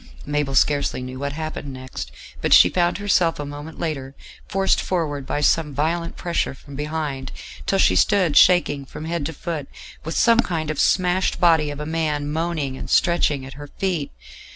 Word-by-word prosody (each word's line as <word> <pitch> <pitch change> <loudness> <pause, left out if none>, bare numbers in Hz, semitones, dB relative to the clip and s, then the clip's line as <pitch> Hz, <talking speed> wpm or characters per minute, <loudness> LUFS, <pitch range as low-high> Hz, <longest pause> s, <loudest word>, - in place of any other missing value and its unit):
Mabel 145 -2 -1
scarcely 140 -2 +2
knew 130 +1 -7
what 140 0 -3
happened 155 -2 -5
next; 130 0 -7 0.3
but - - +3
she - - +7
found 175 -1 +1
herself 180 -5 +1
a 145 - -3
moment 145 +2 -8
later 140 -5 -4 0.3
forced 195 0 +1
forward 145 -7 -2
by 145 - -1
some 150 -1 +2
violent 165 +3 -1
pressure 170 -5 -1
from 140 +1 -13
behind, 150 -2 -4 0.4
till 195 - +2
she - - +4
stood 185 -8 +3
shaking 175 -6 +5
from 150 +3 -9
head 165 -3 -2
to 160 - -6
foot, 155 -3 -5 0.4
with 160 - -4
some 230 -1 +5
kind 160 -8 0
of 155 - -5
smashed 180 0 +2
body 165 -4 +4
of 145 0 -6
a 150 - -4
man 150 -2 -1
moaning 155 -4 -2
and - - -7
stretching 155 -6 +2
at 135 - -9
her 145 - -8
feet. 175 -7 -1
155 Hz, 180 wpm, -22 LUFS, 145-170 Hz, 0.4 s, she